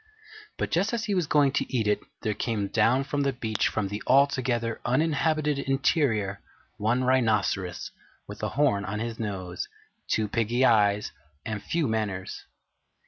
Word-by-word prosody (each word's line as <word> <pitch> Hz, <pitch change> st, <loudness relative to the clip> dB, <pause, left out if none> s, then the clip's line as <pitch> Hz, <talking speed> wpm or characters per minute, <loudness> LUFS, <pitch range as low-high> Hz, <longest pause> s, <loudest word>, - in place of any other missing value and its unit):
But -, -, -2 dB
just 195 Hz, +7 st, +1 dB
as 230 Hz, -1 st, -1 dB
he 205 Hz, -, -1 dB
was 180 Hz, -5 st, +1 dB
going 145 Hz, -2 st, +4 dB
to -, -, -2 dB
eat 120 Hz, -5 st, 0 dB
it 105 Hz, -, +2 dB, 0.2 s
there 110 Hz, -2 st, 0 dB
came 105 Hz, -2 st, -2 dB
down 130 Hz, +4 st, +3 dB
to 145 Hz, +1 st, -3 dB
the 140 Hz, -1 st, +2 dB
beach 110 Hz, -4 st, -1 dB
from 105 Hz, -2 st, -1 dB
the 105 Hz, +2 st, -4 dB
Altogether 130 Hz, -4 st, +2 dB
Uninhabited 150 Hz, +2 st, +1 dB
Interior 135 Hz, -, +1 dB, 0.4 s
one 115 Hz, +5 st, +1 dB
Rhinoceros 110 Hz, -8 st, +1 dB, 0.4 s
with -, -, -9 dB
a -, -, -1 dB
horn 135 Hz, -9 st, +2 dB
on 100 Hz, +2 st, -3 dB
his 115 Hz, 0 st, -4 dB
nose, 95 Hz, -5 st, -4 dB, 0.4 s
two 110 Hz, -1 st, +1 dB
piggy 115 Hz, +4 st, +1 dB
eyes, 105 Hz, -3 st, +3 dB, 0.3 s
and 105 Hz, -2 st, -3 dB
few 165 Hz, -3 st, -1 dB
manners. 105 Hz, -4 st, -3 dB
115 Hz, 155 wpm, -27 LUFS, 105-140 Hz, 0.4 s, going